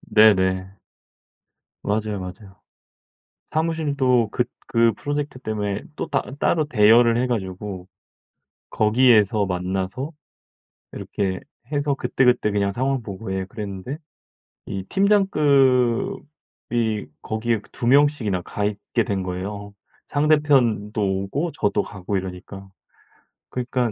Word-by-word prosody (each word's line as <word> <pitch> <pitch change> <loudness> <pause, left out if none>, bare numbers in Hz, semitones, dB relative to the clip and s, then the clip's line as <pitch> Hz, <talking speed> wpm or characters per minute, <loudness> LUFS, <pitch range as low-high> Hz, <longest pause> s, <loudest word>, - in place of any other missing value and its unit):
네네. 95 -3 +4 1.1
맞아요, 105 0 -1
맞아요. 95 +2 -10 0.9
사무실도 145 -8 +1
그 125 - +1 0.3
그 115 -1 +4
프로젝트 145 -2 -3
때문에 105 -4 -3
또 - - -4
따 - - +2 0.2
따로 155 0 +2
대여를 115 -1 +5
해 125 +2 +1
가지고 95 -4 -4 0.8
거기에서 110 -2 +4
만나서 95 - -3 0.8
이렇게 95 -2 -3 0.3
해서 145 -1 0
그때그때 125 -5 +2
그냥 100 -1 +1
상황 130 +3 -1
보고 100 -1 -7
예 95 - -2
그랬는데 105 +6 -6 0.7
이 95 -1 -4
팀장급이 135 - +1
거기에 110 0 -1
그 100 - -21
2 120 - -3
명씩이나 135 -9 +3
가 105 +3 -3
있게 105 +2 -1
된 95 -2 -1
거예요 100 +3 -5 0.3
상대편도 140 -8 +2
오고 100 - -1
저도 105 -1 +1
가고 100 0 -4
이러니까. 95 +1 -7 0.8
그러니까 125 -1 -1
110 Hz, 245 characters per minute, -23 LUFS, 100-130 Hz, 1.1 s, 대여를